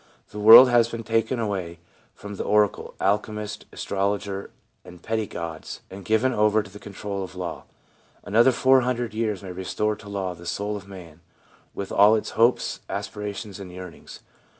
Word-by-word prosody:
The 105 - -7
world 110 +5 +10
has 120 -2 +4
been 115 -1 -6
taken 115 +2 0
away 95 -6 -3 0.4
from 105 0 -9
the - - -3
oracle, 105 -1 +1
alchemist, 105 +1 -2
astrologer 100 0 -3 0.3
and 90 -1 -13
petty 110 -1 -2
gods, 85 -3 -7
and 95 +1 -9
given 110 +7 +2
over 105 0 +3
to 95 - -14
the 105 - -11
control 100 -1 -6
of 90 0 -9
law. 90 -3 -6 0.6
Another 115 +5 +4
four 130 +1 +4
hundred 120 -3 -2
years 110 -3 -2
may 95 - -7
restore 95 +4 -2
to 105 -1 -12
law 95 -2 -3
the 85 0 -12
soul 105 +3 -2
of 100 -1 -9
man, 90 -5 -12 0.6
with 100 - -5
all 105 +2 +6
its 110 - -3
hopes, 115 +3 +2
aspirations 105 -1 -5
and 95 -2 -9
yearnings. 90 -1 -11
105 Hz, 170 wpm, -24 LUFS, 95-110 Hz, 0.6 s, world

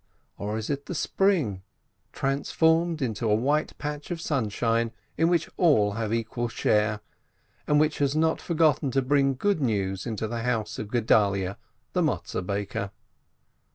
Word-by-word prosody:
Or 105 +2 -2
is 110 +5 -3
it 140 0 -4
the 180 - -4
Spring, 155 - +1 0.5
transformed 160 +3 +1
into 115 -2 -1
a 105 - +4
white 145 +7 0
patch 150 0 -5
of 175 -2 -3
sunshine, 115 -5 0 0.2
in 165 +1 +3
which 175 -1 +2
all 110 - +4
have 110 +1 -3
equal 115 +1 -1
share, 105 -2 +1 0.7
and 150 0 +4
which 155 0 +1
has 140 0 +1
not 160 +1 +2
forgotten 155 -4 +2
to 135 +1 +1
bring 135 0 +2
good 195 +4 0
news 100 -6 -1
into 110 -1 -2
the 115 +1 -3
house 115 -3 -1
of 105 - -4
Gedalyeh 100 -5 +2 0.4
the - - +2
Matzeh - - -1
baker 100 +1 -3
125 Hz, 155 wpm, -26 LUFS, 105-150 Hz, 0.7 s, a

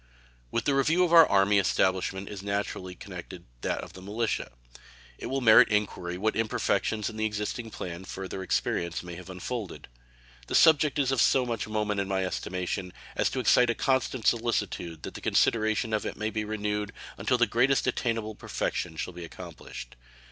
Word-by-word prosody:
With 115 - -1
the 140 - +2
review 155 +6 +3
of 175 -1 +1
our 165 -1 +9
Army 100 +1 +4
establishment 95 +1 +1
is 100 -2 -7
naturally 100 -2 -3
connected - - -9 0.2
that - - -1
of - - -10
the 95 - -11
militia. 110 +4 -2 0.7
It - - -5
will 135 0 -1
merit 110 -3 +8
inquiry 95 -4 -1
what 110 +3 0
imperfections 110 -1 0
in 110 - -6
the 110 - 0
existing 105 +2 -3
plan 90 -3 -6
further 95 0 -6
experience 85 -2 -1
may 90 -1 -8
have 90 +2 -10
unfolded. 95 - -6 0.6
The - - -2
subject 150 -2 +5
is 135 -2 +2
of 135 - +2
so 130 -2 +4
much 115 -4 -3
moment 105 -1 -1
in 100 - -1
my 95 -1 0
estimation 90 0 -3 0.2
as - - +2
to - - -3
excite 125 -1 +4
a 120 - +1
constant 130 -2 0
solicitude 105 -8 0
that - - -6
the - - -8
consideration 110 0 +2
of 105 - +1
it - - -5
may 110 +1 -2
be 110 -1 -2
renewed 105 0 -2 0.3
until 125 - +2
the 120 - +4
greatest 125 +5 +2
attainable 115 -3 -1
perfection 85 -4 -3
shall 90 - -4
be 90 0 -8
accomplished. 85 - -9
105 Hz, 180 wpm, -28 LUFS, 95-120 Hz, 0.7 s, our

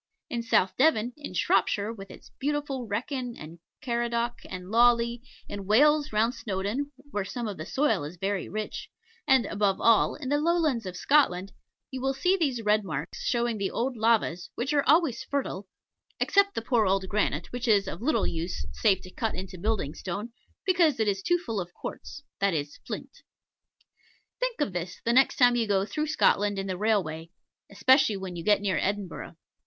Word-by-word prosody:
In 235 - -1
South 190 -5 +2
Devon, 250 -5 +3
in 290 -11 -8
Shropshire 200 +4 +1
with 195 -3 -10
its - - -14
beautiful 285 -3 -2
Wrekin, 245 +3 -3
and 160 +3 -10 0.2
Caradoc, 235 -1 -1
and 185 +1 -7
Lawley 235 0 +3 0.3
in 200 -2 -7
Wales, 295 +7 +4
round 220 +3 +2
Snowdon 210 +7 -3 0.2
(where 205 -4 -1
some 235 +4 -4
of 205 - -5
the 155 - -7
soil 245 - +1
is 155 +5 -7
very 195 +1 -2
rich), 215 0 -5 0.4
and, 265 -5 +5
above 200 -1 0
all, 230 -2 +4
in 265 -4 -6
the 290 +1 +2
Lowlands 310 - +1
of 180 -1 -6
Scotland, 195 -9 +2 0.4
you 265 +1 -2
see 360 +8 +2
these 275 -10 -1
red 210 0 +3
marks, 155 -5 -5
showing 235 -2 0
the 195 - 0
old 250 +2 -2
lavas, 220 -6 +1
which 260 +5 -2
are 285 - +4
always 300 -6 +3
fertile, 255 -9 -3 0.5
except 400 0 +3
the 225 - -2
poor 230 -4 +2
old 190 0 +1
granite, 180 -6 -1
which 245 +1 -4
is 205 -3 +4
of - - -6
little 305 +6 +1
use 170 +2 -3
save 195 -4 +2
to 185 - -11
cut 225 -2 -2
into 185 0 -6
building 185 -5 -1
stone, 205 +8 -5 0.3
because 340 -8 +3
it 220 - +2
is 195 -1 0
too 350 - +2
full 225 - -3
of 175 0 -9
quartz 285 - -8 0.2
that 195 -3 +2
is, 145 -1 -4
flint. - - -7 1.2
Think - - -2
of 205 - 0
this 175 0 -5
the 235 - +2
next 265 +2 +4
time 245 -1 +5
you 230 -2 +1
go 195 -1 +2
through 300 +10 -2
Scotland 205 -9 +2
in 195 - -2
the 190 -1 -3
railway, 180 -6 0 0.4
especially 240 +2 +4
when 190 -2 -6
you 170 - -6
get 205 +1 +3
near 190 -5 0
Edinburgh. 200 -2 -3
220 Hz, 185 wpm, -27 LUFS, 195-260 Hz, 1.2 s, and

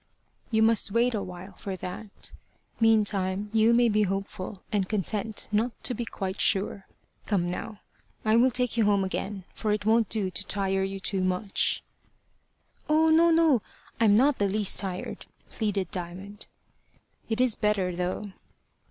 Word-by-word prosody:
"You 220 -1 +3
must 225 -1 +2
wait 235 +4 +2
a 210 - -1
while 180 +1 -8
for 190 +1 -6
that. 190 +3 -9 0.5
Meantime 205 -3 +2
you 225 +1 +4
may 240 0 +4
be 215 -1 +2
hopeful, 195 0 -3
and 200 -3 0
content 210 +1 -2
not 225 +3 +1
to 250 - +1
be 240 -1 -4
quite 190 -3 -4
sure. 195 -1 +1 0.4
Come 195 -5 +1
now, 205 +4 -5 0.4
I 215 0 +4
will 245 +3 +5
take 250 -1 0
you 225 - +3
home 200 -1 +3
again, 195 +1 -4
for 215 - -2
it 210 -1 -1
won't 225 0 +3
do 200 -4 -1
to 200 +1 -3
tire 195 -1 0
you 195 0 -3
too 190 0 -1
much." 185 +2 0 1.1
"Oh, 315 +1 +4
no, 330 +2 +5
no. 325 -7 +4 0.4
I'm 210 -2 +5
not 275 +3 +3
the 200 -1 +2
least 205 0 +3
tired," 185 -2 -5 0.2
pleaded 200 -5 -2
Diamond. 190 +3 -7 0.8
"It 225 +1 -1
is 250 -2 +4
better, 200 -5 0
though." 180 +3 -2
210 Hz, 160 wpm, -27 LUFS, 190-225 Hz, 1.1 s, will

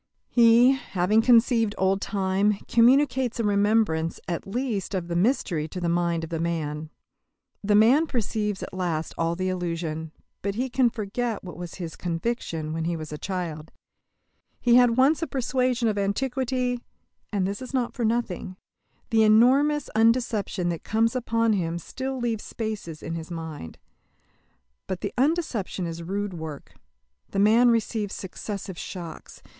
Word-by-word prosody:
He, 235 +1 +6
having 215 -5 +1
conceived 230 -2 +4
old 190 +1 +1
time, 195 +1 +1
communicates 255 0 +3
a - - +1
remembrance 205 -5 +2
at 170 +1 -3
least 215 -3 -2
of 175 -2 -3
the 170 - -2
mystery 175 - +1
to 180 - -6
the 175 - -1
mind 170 -1 0
of 165 - -7
the 165 - -2
man. 155 -2 -2 0.7
The 205 +1 +3
man 250 +10 +5
perceives 210 -5 -2
at - - -8
last 170 -4 -2
all 165 0 0
the 185 +1 -2
illusion, 165 -3 -3 0.3
but 200 0 -2
he 250 +3 -2
cannot 245 -2 +2
forget 225 +1 -3
what 180 - -8
was 175 -1 -7
his 170 -4 -6
conviction 165 -3 -3
when 165 0 -2
he 170 0 -1
was 155 -1 -7
a 150 - -6
child. 170 -5 -4 0.9
He 240 - +3
had 245 -1 +5
once 285 +5 +4
a 330 - -1
persuasion 255 -2 0
of 210 -2 0
Antiquity. 250 +4 -1 0.5
And 200 -3 0
this 200 +4 -3
is 255 - -7
not 255 -3 -1
for 240 - -3
nothing. 220 -5 -1 0.5
The 225 -1 +4
enormous 260 +7 +4
undeception 220 -5 +2
that 170 - -5
comes 225 +2 +1
upon 230 -2 +1
him 170 -4 -1
still 265 +9 -5
leaves 235 -3 -2
spaces 215 -8 -5
in 165 - -4
his 165 0 -6
mind. 160 - -7 1.1
But 185 -2 -4
the - - -3
undeception 260 - 0
is 165 0 -5
rude 195 +3 -3
work. 160 -4 -8 0.6
The - - -5
man 225 +5 +5
receives 225 -3 0
successive 195 -1 -6
shocks. 170 -4 -8
205 Hz, 155 wpm, -25 LUFS, 175-240 Hz, 1.1 s, He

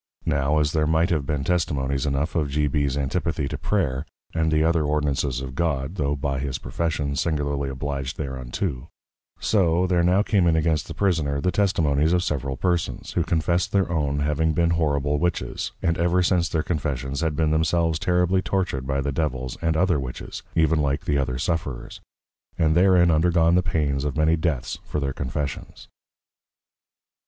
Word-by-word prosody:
Now, 70 +2 +1
as 75 -1 +2
there 75 -1 +1
might 80 +3 +2
have 75 -5 0
been 75 -3 -1
Testimonies 70 -5 0
enough 70 +3 -1
of 75 -4 0
G. 75 +2 +1
B's 70 -1 0
Antipathy 70 +1 -1
to - - -4
Prayer, 75 -10 -1 0.3
and 80 -1 +1
the 75 0 +3
other 80 -1 +2
Ordinances 75 -3 0
of 65 -1 -6
God, 75 -1 -1
tho 75 -6 -1
by 70 -1 -2
his 70 -2 -3
Profession, 75 -4 -2
singularly 70 -2 -1
Obliged 70 0 -4
thereunto; 65 +1 -4 0.5
so, 90 -4 +2
there 90 -1 +2
now 90 +4 +3
came 95 -5 +2
in 80 - +3
against 80 -2 +1
the - - -7
Prisoner, 80 -8 +1
the 90 +5 0
Testimonies 80 -6 +2
of 90 0 +2
several 70 -5 -2
Persons, 85 +4 -1
who 85 - +1
confessed 85 +2 0
their 95 -3 +2
own 75 -3 0
having 75 +2 +1
been 85 +2 +2
horrible 75 -3 +1
Witches, 90 +1 -2
and 85 -1 +1
ever 90 +2 +2
since 85 -1 +2
their 80 -2 0
Confessions, 70 -3 -2
had 80 -2 0
been 80 0 +1
themselves 80 0 +1
terribly 90 +1 +2
Tortured 90 -10 -2
by 70 0 0
the 70 +1 -1
Devils 65 -4 -2
and 80 -1 +1
other 90 -3 +2
Witches, 65 -2 -6
even 80 -1 +3
like 70 0 -1
the 70 - +1
other 65 -2 -1
Sufferers; 65 -4 -3 0.6
and 80 -1 +3
therein 90 -1 +5
undergone 85 +1 +3
the 90 - +4
Pains 70 -5 -1
of 75 +1 -2
many 80 +1 +3
Deaths 80 -6 -2
for - - -3
their 70 -2 -2
Confessions. 70 +1 -5
75 Hz, 175 wpm, -24 LUFS, 70-85 Hz, 0.6 s, therein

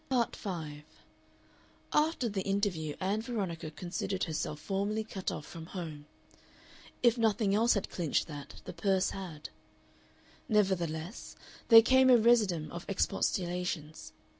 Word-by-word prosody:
Part 245 -3 +1
5 160 -7 -5 1.1
After 300 -4 +2
the 200 -3 -2
interview 190 -6 -1
Ann 195 +3 0
Veronica 195 -9 -3
considered 180 +4 -3
herself 155 -2 -3
formally 200 +5 -1
cut 195 -3 -4
off 150 - -6
from 165 -1 -9
home. 160 -6 -7 1.0
If 240 0 +4
nothing 215 -2 +2
else 225 +3 +4
had 200 - -2
clinched 165 -5 0
that, 145 -2 -9
the 180 - -6
purse 190 +2 +1
had. 175 -6 -7 1.0
Nevertheless 185 -3 -1 0.3
there 225 -1 +10
came 260 +2 +5
a 250 - +8
residuum 215 -9 +3
of 170 - -6
expostulations. 180 -4 -2
190 Hz, 125 wpm, -31 LUFS, 165-215 Hz, 1.1 s, there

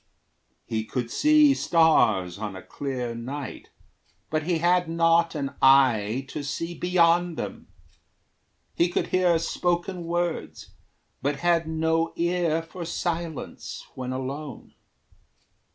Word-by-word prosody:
He 110 -2 -2
could 120 +1 -4
see 300 -1 +5
stars, 110 - +3
On 105 -2 -5
a 95 - -9
clear 130 -4 -4
night, 130 +4 -7 0.6
but 155 0 +1
he 170 +2 0
had 175 +1 +2
not 165 0 +3
an 140 -2 -3
eye 130 -3 +4
To 150 - -5
see 165 +4 -4
beyond 175 -1 +2
them. - - -6 1.1
He 170 - +2
could - - -1
hear 180 -2 +3
spoken 175 +2 -2
words, 175 0 -3 0.5
But 140 0 -2
had 170 -2 +2
no 160 +1 0
ear 170 -2 0
for 170 +2 -8
silence 170 -2 -4
when 130 -1 -5
alone. 135 +3 -6
165 Hz, 120 wpm, -25 LUFS, 135-175 Hz, 1.1 s, see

